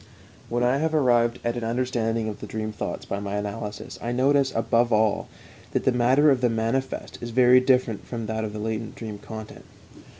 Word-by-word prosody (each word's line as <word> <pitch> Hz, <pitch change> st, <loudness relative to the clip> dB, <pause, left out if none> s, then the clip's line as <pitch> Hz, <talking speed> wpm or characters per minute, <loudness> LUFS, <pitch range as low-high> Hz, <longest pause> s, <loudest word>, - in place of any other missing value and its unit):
When 120 Hz, +1 st, 0 dB
I 125 Hz, +2 st, +3 dB
have 160 Hz, +2 st, 0 dB
arrived 120 Hz, -4 st, +3 dB
at 120 Hz, 0 st, -1 dB
an 120 Hz, -, -4 dB
understanding 115 Hz, -1 st, -1 dB
of 105 Hz, -, -5 dB
the -, -, -7 dB
dream 110 Hz, 0 st, -4 dB
thoughts 105 Hz, -, -5 dB
by 100 Hz, -, -3 dB
my 100 Hz, 0 st, -4 dB
analysis 105 Hz, +1 st, -5 dB
I 120 Hz, -, -2 dB
notice, 135 Hz, +2 st, +3 dB
above 115 Hz, +1 st, +2 dB
all, 110 Hz, -1 st, +2 dB, 0.5 s
that -, -, 0 dB
the -, -, +3 dB
matter 130 Hz, +5 st, +4 dB
of 130 Hz, -2 st, +1 dB
the 125 Hz, -, +3 dB
manifest 115 Hz, +4 st, -2 dB
is 120 Hz, -, -5 dB
very 125 Hz, +1 st, +6 dB
different 125 Hz, -4 st, +1 dB
from 115 Hz, -2 st, -4 dB
that 110 Hz, 0 st, -2 dB
of 110 Hz, -, -3 dB
the 105 Hz, -, -7 dB
latent 110 Hz, +1 st, -4 dB
dream 110 Hz, -3 st, -7 dB
content. 110 Hz, +1 st, -9 dB
115 Hz, 200 wpm, -25 LUFS, 110-125 Hz, 0.5 s, very